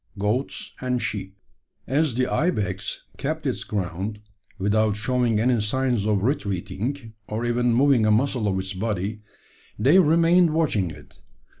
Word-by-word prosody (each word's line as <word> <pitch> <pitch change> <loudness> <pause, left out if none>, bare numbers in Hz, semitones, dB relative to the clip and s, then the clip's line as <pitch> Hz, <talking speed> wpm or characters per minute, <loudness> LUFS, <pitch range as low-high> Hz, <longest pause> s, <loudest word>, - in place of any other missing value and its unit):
GOATS 105 +7 -2
AND 125 -1 0
SHEEP. 95 -3 -4 0.5
As 140 0 +1
the 130 +1 +2
ibex 150 - -1
kept - - -3
its - - -1
ground, 100 +2 -3 0.4
without 105 +1 +1
showing 115 0 +1
any 120 0 +2
signs 120 -1 0
of 105 -2 +1
retreating, 115 - -2
or 110 +3 -3
even 120 0 +1
moving 125 -2 +4
a - - +4
muscle 120 0 +1
of 95 -1 0
its 95 +1 -3
body, 105 +1 -3 0.6
they 140 - +5
remained 170 0 +4
watching 115 - +1
it. 75 -2 -13
110 Hz, 140 wpm, -24 LUFS, 105-130 Hz, 0.6 s, they